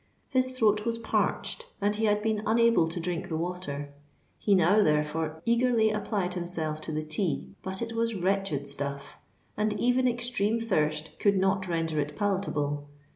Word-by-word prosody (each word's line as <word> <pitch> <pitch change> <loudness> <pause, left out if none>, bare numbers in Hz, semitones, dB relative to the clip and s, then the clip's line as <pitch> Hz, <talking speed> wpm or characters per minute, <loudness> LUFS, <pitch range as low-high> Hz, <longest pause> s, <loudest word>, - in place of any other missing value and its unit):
His 255 -1 +1
throat 210 -3 +3
was 230 0 -1
parched, 355 - -1
and 205 +1 +1
he 220 +1 0
had 210 0 +2
been 220 -1 0
unable 230 -5 +4
to 165 +2 -3
drink 170 0 -3
the 160 - -1
water: 160 -5 -4 0.5
he 205 - +3
now, 185 +4 +5
therefore, 155 -1 0
eagerly 235 -2 +3
applied 200 -3 -1
himself 165 -3 -2
to 160 - -5
the 155 0 -2
tea. 155 +2 -2
But 190 +3 -4
it 230 0 -5
was 230 0 0
wretched 190 -6 0
stuff; 140 0 -5 0.4
and 210 0 +1
even 250 +1 +3
extreme 235 -3 0
thirst 155 -8 -1
could 200 -1 +3
not 190 0 +1
render 165 -2 -1
it 145 0 -2
palatable. 150 -8 -1
190 Hz, 165 wpm, -28 LUFS, 155-220 Hz, 0.5 s, now